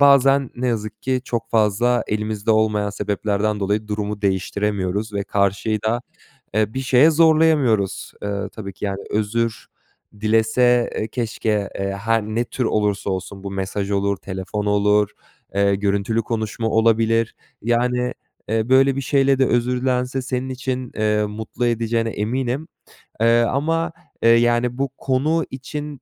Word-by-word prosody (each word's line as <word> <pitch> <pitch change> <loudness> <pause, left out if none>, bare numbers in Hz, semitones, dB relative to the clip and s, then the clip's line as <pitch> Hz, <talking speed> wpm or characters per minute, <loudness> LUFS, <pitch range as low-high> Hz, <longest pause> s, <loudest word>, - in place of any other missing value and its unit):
bazen 140 -1 +5
ne 125 +1 -2
yazık 110 -2 -3
ki 130 -1 0
çok 115 -2 -3
fazla 115 +3 +2
elimizde 105 0 -2
olmayan 105 -2 +2
sebeplerden 105 +1 -1
dolayı 105 +2 -1
durumu 105 -1 -3
değiştiremiyoruz 100 +1 -1
ve 100 -1 -1
karşıyı 100 +2 0
da, 115 +3 0 0.5
eee, 110 +1 +1
bir 130 - -1
şeye 130 +4 +5
zorlayamıyoruz. 155 - +3
Iıı, 100 -1 -3
tabii 100 -3 -8
ki, 105 - -8
yani 100 -1 -2
özür 110 +2 -1 0.5
dilese, 115 +3 +3
eee, 110 - -2
keşke, 110 -3 -1
eee, 100 0 -2
her 115 +3 0
ne 110 +3 -1
tür 125 +1 -3
olursa 105 -2 0
olsun 95 +1 -5
bu 100 - -4
mesaj 100 +1 -3
olur, 100 0 +1
telefon 95 +2 -5
olur, 105 0 +3 0.4
eee, 100 0 +3
görüntülü 100 +3 0
konuşma 110 0 -2
olabilir. 115 0 +2 0.3
Yani, 125 +1 +1 0.3
eee, 110 +1 0
böyle 135 +1 +5
bir 135 - 0
şeyle 135 0 +2
de 130 - +4
özür 125 +1 +1
dilense 130 0 0
senin 130 0 -3
için, 130 -1 -4
eee, 105 0 +1
mutlu 110 +3 -3
edeceğine 115 0 0
eminim. 125 +8 -2 0.5
Eee, 115 +1 +5
ama, 160 +8 0 0.3
eee, 115 - +6
yani 120 +1 +3
bu 135 0 0
konu 150 +5 +1
için 145 +1 -6
110 Hz, 145 wpm, -21 LUFS, 105-125 Hz, 0.5 s, eee